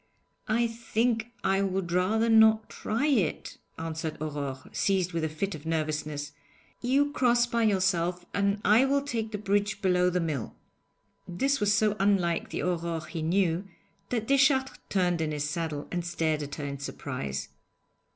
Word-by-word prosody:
'I 235 +2 +2
think 230 0 0 0.2
I 195 +1 +2
would 190 -2 -1
rather 200 +6 +2
not 220 -1 +5
try 225 +7 -1
it,' 240 - 0 0.2
answered 160 -1 -4
Aurore, 145 -3 -4
seized 185 -3 0
with 165 -1 -1
a 160 - 0
fit 190 +6 -3
of 155 +1 -8
nervousness. 150 -2 -2 0.5
'You 275 +4 +2
cross 240 -3 +3
by 235 -1 -1
yourself, 180 -3 +1
and 200 0 +1
I 215 +5 +6
will 275 +1 +2
take 230 -6 -3
the 210 - -3
bridge 205 +1 0
below 180 -2 +3
the 180 0 0
mill.' 155 -9 -3 0.7
This 270 +11 0
was 205 -1 +2
so 210 0 +3
unlike 195 -4 +1
the - - -3
Aurore 170 -2 -2
he 165 - -4
knew 175 +2 +1 0.4
that 230 -3 -1
Deschartres 270 -1 +3
turned 180 -3 +1
in 155 -1 -1
his 150 -1 -2
saddle 150 -2 -3
and 175 -1 -2
stared 160 -3 -1
at 145 0 -5
her 145 - -5
in 140 -1 -5
surprise. 125 - -5
185 Hz, 160 wpm, -28 LUFS, 160-220 Hz, 0.7 s, I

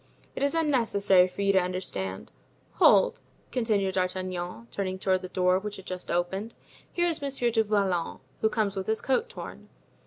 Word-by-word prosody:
"It - - -5
is 280 +3 +1
unnecessary 225 - +3
for 200 +2 -5
you 200 0 +3
to 190 - +5
understand. 180 - -4 0.5
Hold," - - +5 0.3
continued 210 -6 +1
D'Artagnan, 185 +2 -3
turning 190 -2 -3
toward 190 -1 +1
the 185 - -7
door, 185 0 +2
which 210 +1 -6
had 190 - -11
just 185 -1 -6
opened, 190 +6 -2 0.4
"here 345 - +1
is 335 -4 0
Monsieur 270 -4 0
du 225 -1 +3
Vallon, 195 -5 0 0.2
who 220 - +2
comes 210 -3 0
with 190 -1 -4
his 220 0 +1
coat 445 - 0
torn." 470 - -9
195 Hz, 175 wpm, -27 LUFS, 185-225 Hz, 0.5 s, to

